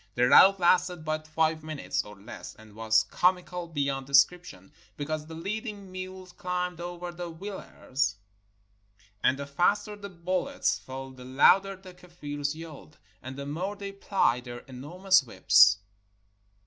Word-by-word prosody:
The 125 +1 +3
rout 190 +8 +7
lasted 180 -2 +2
but 155 0 -3
five 155 0 0
minutes 155 -2 -3
or 105 0 -12
less, 105 +5 -10
and 110 -1 -16
was 110 0 +3
comical 180 -1 0
beyond 140 -4 -2
descrip 140 +6 +4
tion, 95 - -13 0.3
because 155 +1 -4
the 160 - -8
leading 200 +2 -5
mules 185 0 -8
climbed 180 -2 -3
over 175 0 -6
the 175 0 -6
wheel 190 +4 -7
ers, 135 0 -2 1.1
and 135 - +3
the 140 - -5
faster 205 +9 +1
the 200 -1 -9
bullets 185 +10 -1
fell 135 0 -8
the 130 -1 -12
louder 190 +10 +4
the 185 -1 -13
Kafirs 150 -5 -5
yelled, 155 -2 -11 0.2
and 130 +1 -8
the 140 - -5
more 180 +8 -3
they 200 -1 -6
plied 190 - 0
their 120 0 -7
enormous 175 +9 +1
whips. 100 -4 +5
165 Hz, 150 wpm, -28 LUFS, 135-185 Hz, 1.1 s, rout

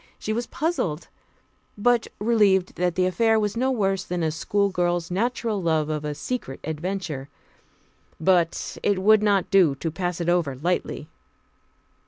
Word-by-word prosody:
She 215 - -3
was 235 +2 -2
puzzled, 265 - -2 0.7
but 240 +2 +2
relieved 205 -4 +3
that 180 -1 0
the 185 - +2
affair 220 +4 +2
was 210 0 -1
no 255 +3 +1
worse 195 -6 0
than 180 -2 -3
a 160 - +1
schoolgirl's 175 0 0
natural 225 +1 -1
love 160 -3 +1
of 150 -1 -2
a 150 0 -3
secret 150 - -4
adventure. 160 -3 -4 0.9
But 170 0 +1
it 200 -2 +1
would 215 +1 +6
not 200 -3 +1
do 180 -8 +5
to 165 +3 -4
pass 175 +1 -3
it 170 - -2
over 175 -6 +1
lightly. 155 0 -2
185 Hz, 150 wpm, -24 LUFS, 165-210 Hz, 0.9 s, would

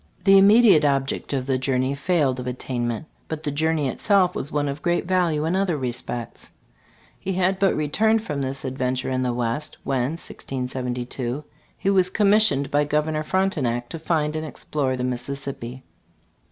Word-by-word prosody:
The 195 0 +7
immediate 200 -4 +6
object 135 -2 0
of 135 -3 -1
the 130 -1 0
journey 130 0 0
failed 140 -3 +1
of 125 - -5
attainment, 120 +1 -3 0.2
but 160 -1 -5
the 145 - -1
journey 155 0 +1
itself 185 - +2
was 145 - -4
one 145 -1 0
of 140 +2 -4
great 175 0 0
value 175 -4 +1
in 165 +3 0
other 190 -4 +1
respects 120 -2 -4 0.7
He 190 - -3
had 185 +1 +1
but 195 0 +3
returned 220 +9 +2
from 145 -8 -3
this 135 +1 -3
adventure 130 0 -2
in 130 0 0
the 125 -1 0
West 120 +4 -2
when 130 +1 0
(1672) 125 -3 -4 0.3
he 195 - +1
was 185 -2 +4
commissioned 200 -9 +3
by 145 +1 +3
Governor 150 +1 0
Frontenac 150 -9 0
to 165 - -6
find 155 -2 0
and 155 - -2
explore 145 -3 -2
the 125 - -3
Mississippi. 125 0 -4
145 Hz, 165 wpm, -23 LUFS, 130-175 Hz, 0.7 s, The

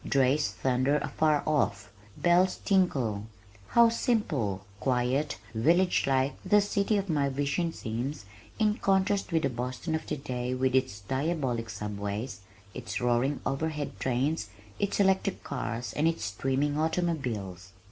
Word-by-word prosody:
Drays 135 +2 +2
thunder 130 +2 +1
afar 150 +1 +1
off. 105 -10 0 0.3
Bells 180 +2 +3
tinkle. 130 - +1 0.4
How 235 -1 +6
simple, 150 - 0
quiet, 130 +4 0
almost - - -21
village 170 +12 +3
like 135 0 +2
this 205 +2 +4
city 200 +1 +2
of 200 0 -1
my 145 -5 +1
vision 145 +5 -1
seems 120 0 -4 0.3
in 215 -1 +2
contrast 195 0 +1
with 160 -1 +2
the 140 - +2
Boston 125 +7 -3
of 160 0 -2
today 125 -4 -3
with 130 0 +1
its 130 -6 +1
diabolic 130 - -1
subways, 105 +1 -4 0.3
its 105 -3 -4
roaring 125 +3 +1
overhead 150 +1 -2
trains, 130 -1 0 0.3
its 200 0 -1
electric 190 0 +2
cars 115 -1 -4
and 155 +2 +2
its 165 0 -1
streaming 135 +8 0
automobiles! 125 - -2
140 Hz, 135 wpm, -29 LUFS, 120-165 Hz, 0.4 s, How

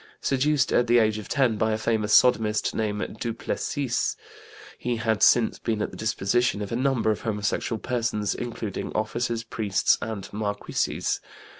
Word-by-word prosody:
Seduced 140 +1 +1
at 120 - +3
the 120 +1 +5
age 110 -2 +3
of 105 - -9
10 130 -7 +2
by 110 0 +1
a - - 0
famous 110 -1 0
sodomist 110 -4 +4
named 105 0 -3
Duplessis, 120 +3 -2 0.6
he 125 -1 -1
had 110 -1 0
since 120 -2 +4
been 110 -2 -1
at - - -4
the - - -10
disposition 110 +1 0
of 100 - -7
a - - -1
number 125 -3 +1
of 105 - -3
homosexual 105 +1 -1
persons, 115 -4 -1
including 115 -4 -5
officers, 115 +1 -1
priests, 105 -4 +1
and 110 -3 -5
marquises. 105 -1 -2
110 Hz, 155 wpm, -25 LUFS, 105-120 Hz, 0.6 s, the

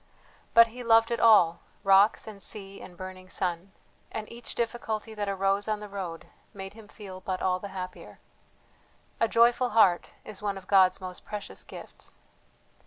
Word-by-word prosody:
But 230 0 +10
he 250 0 -7
loved 225 0 +4
it 235 - 0
all, 195 -7 +6 0.2
rocks 195 +1 +5
and 210 -3 -9
sea 195 -2 -5
and 180 -1 -12
burning 185 0 -9
sun; 180 +1 -2 0.4
and 215 -1 -5
each 235 0 -8
difficulty 225 -2 -3
that 205 -2 -3
arose 195 +1 0
on 215 -1 -1
the 210 - -8
road 185 -5 -6 0.3
made 195 0 -7
him 220 -1 -14
feel 195 -3 -10
but 185 0 -3
all 185 -1 0
the 200 - -6
happier. 185 -2 -8 1.0
A 230 - +3
joyful 240 +2 +4
heart 180 -5 +5 0.2
is 210 -2 -8
one 200 -1 -2
of 190 - -11
God's 190 -2 +4
most 185 -1 -7
precious 210 -1 -7
gifts. - - -11
200 Hz, 170 wpm, -28 LUFS, 185-220 Hz, 1.0 s, But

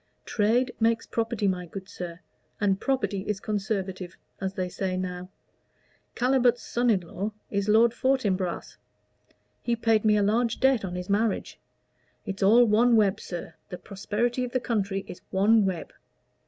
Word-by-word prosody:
Trade 240 +4 +1
makes 225 0 +2
property, 225 -2 -1
my 180 -2 -1
good 190 +2 -8
sir, 175 -3 -7 0.4
and 195 -2 +2
property 255 -7 0
is 210 -2 -1
conservative, 195 -4 -3 0.2
as 190 0 -3
they 185 -1 -1
say 185 +1 -3
now. 180 0 -4 0.9
Calibut's 250 -1 +2
son 240 +1 0
in 200 -5 +3
law 195 +5 -5 0.2
is 200 0 -1
Lord 225 +2 +5
Fortinbras. 205 -9 -1 0.8
He 235 - 0
paid 225 -2 +2
me 210 -1 +4
a 205 - +2
large 230 +3 +1
debt 265 -4 +3
on 180 -2 -4
his 180 0 -5
marriage. 205 +1 0 0.7
It's 195 +1 -5
all 225 +5 +6
one 230 +2 +4
web, 205 -3 +3
sir. 175 -2 -7 0.2
The 180 - -6
prosperity 215 +6 -2
of 245 - -5
the 255 - +2
country 200 -5 -2
is - - -9
one 205 +2 +4
web." 180 -4 -3
210 Hz, 155 wpm, -27 LUFS, 190-235 Hz, 0.9 s, all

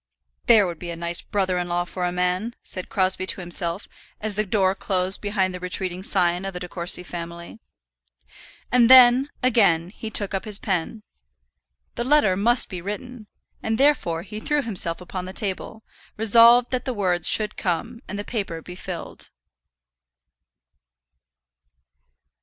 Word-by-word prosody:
"There 220 -4 +6
would 170 -3 -6
be 175 - -7
a 170 - -5
nice 170 +1 -2
brother 190 -3 -1
in 175 0 -4
law 175 0 -1
for 180 +1 -4
a 175 - -1
man," 180 +6 -1
said 185 -1 -6
Crosbie 185 -1 +1
to - - 0
himself, 175 +1 +3 0.3
as 215 0 -2
the 210 +1 -1
door 190 -1 +2
closed 190 -1 -2
behind 195 -3 -1
the 180 - -6
retreating 180 0 -4
scion 180 -2 +1
of 195 0 -5
the 180 - -6
De 180 - -6
Courcy 175 +1 -1
family. 170 +3 -8 1.1
And 245 -1 +4
then, 255 +1 +7
again, 190 -9 +2
he 220 +1 -8
took 205 -2 -1
up 195 - -2
his 210 -2 +1
pen. 195 +2 -3 0.9
The 235 - -3
letter 255 -8 +3
must 235 +5 +1
be 180 -2 -7
written, 215 +4 -7 0.3
and 220 0 -2
therefore 245 - +1
he 210 +2 -8
threw 295 +5 -1
himself 185 -7 -1
upon 180 0 -6
the 185 - -8
table, 210 +2 -4 0.3
resolved 230 +3 +5
that 255 -1 -2
the 255 -2 -3
words 180 -4 +1
should 215 -1 +1
come 230 +7 -3
and 205 - -6
the 205 - -5
paper 200 -8 -4
be 180 - -10
filled. 180 -1 -8
190 Hz, 160 wpm, -23 LUFS, 180-220 Hz, 1.1 s, then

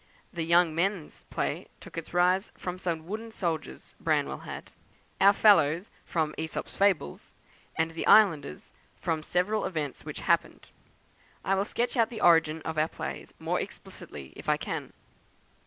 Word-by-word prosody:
The 170 - -3
'Young 170 0 +4
Men's' 175 0 -2
play - - -2
took - - -12
its 165 -1 -6
rise 180 +3 +2
from 180 0 -5
some 165 -3 -2
wooden 220 +5 -5
soldiers 165 - -4
Branwell - - 0
had: - - -8 0.5
'Our 200 +1 +8
Fellows' 195 -4 +4
from 155 -2 -1
'AEsop's 160 0 -4
Fables;' 195 - 0 0.4
and 165 0 0
the 165 - -4
'Islanders' 165 - +4 0.3
from 160 -2 -1
several 180 +7 0
events 155 -7 -3
which - - -6
happened. - - 0 0.8
I 195 - +2
will 195 +1 +1
sketch 240 +4 -1
out 230 -1 +4
the 230 -3 -6
origin 160 -2 +4
of 160 -1 -2
our 155 - +3
plays 70 -2 -7
more - - -1
explicitly 70 -2 -9
if - - -6
I - - +4
can. - - -5
170 Hz, 155 wpm, -28 LUFS, 160-195 Hz, 0.8 s, Our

